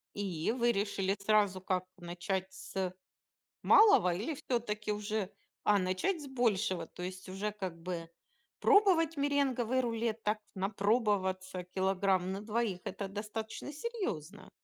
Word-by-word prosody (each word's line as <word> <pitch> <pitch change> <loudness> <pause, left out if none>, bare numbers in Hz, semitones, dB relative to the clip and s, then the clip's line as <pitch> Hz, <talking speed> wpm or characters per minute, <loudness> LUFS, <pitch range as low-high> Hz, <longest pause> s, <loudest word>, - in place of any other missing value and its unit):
И 190 -2 -1
вы 240 -1 +2
решили 195 -2 0
сразу 200 -2 +3
как: 185 -1 -1
начать 185 +2 -3
с 190 -1 -4 0.7
малого 410 - +6
или 230 - -2
всё-таки 215 -5 -2
уже, 210 -1 -2 0.3
а 205 -1 +5
начать 185 - 0
с 285 - -7
большего? 215 -9 +1
То 180 - -10
есть 185 +1 -6
уже 200 +3 -3
как 190 -5 -5
бы 170 -1 -4 0.5
пробовать 370 -7 +5
меренговый 265 -3 +1
рулет, 230 -2 -1
так 210 +1 +1 0.2
напробоваться 195 -2 0
килограмм 190 -1 +1
на 195 - -4
2- 215 -3 -1
это 200 -1 -4
достаточно 220 +6 -5
серьезно. 290 - -4
205 Hz, 125 wpm, -33 LUFS, 185-235 Hz, 0.7 s, малого